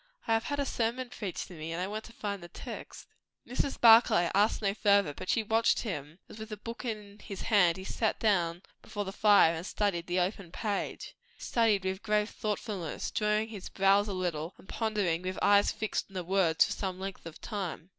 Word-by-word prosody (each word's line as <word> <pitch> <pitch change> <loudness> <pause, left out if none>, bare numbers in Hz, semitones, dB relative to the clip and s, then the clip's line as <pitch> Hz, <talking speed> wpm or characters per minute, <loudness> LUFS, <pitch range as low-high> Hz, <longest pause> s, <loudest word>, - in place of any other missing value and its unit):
"I 225 - +1
have 225 0 +1
had 285 0 -2
a 280 - +1
sermon 245 +1 -1
preached 200 -6 -5
to - - -10
me, 160 0 -6
and 165 - -3
I 180 - -1
want 215 +3 -5
to - - -12
find 205 -4 -4
the 175 - -9
text." - - -9 0.4
Mrs. 260 +2 -2
Barclay 225 -7 +6
asked 205 +3 +3
no 200 -2 0
further, 200 -7 +3
but 185 - -8
she 225 - +2
watched 225 +2 +2
him, 155 - -5
as 220 - -12
with 220 0 -7
the 215 - -6
book 230 +3 -7
in 210 -3 -6
his 195 - -7
hand 185 -6 +4
he 190 - -7
sat 220 +3 -1
down 180 -5 +1 0.2
before 205 -1 -5
the 190 - -4
fire 205 -6 +5
and 165 0 -5
studied 190 -3 -1
the 180 +1 +1
open 180 -1 -2
page. 205 +1 -3 0.2
Studied 220 -5 +1
with 190 0 -2
grave 210 -1 +1
thoughtfulness, 205 -5 -4
drawing 210 +1 +1
his 205 -4 -8
brows 195 +1 +3
a 200 - -3
little, 175 -2 -3
and - - -18
pondering 205 -8 -1
with 185 +1 -4
eyes 200 0 +4
fixed 220 -1 -3
on 195 - -17
the 180 - -2
words 175 -3 +3
for - - -5
some 185 -2 -3
length 190 -3 -6
of 160 - -10
time. 185 -5 -5
200 Hz, 215 wpm, -30 LUFS, 180-220 Hz, 0.4 s, Barclay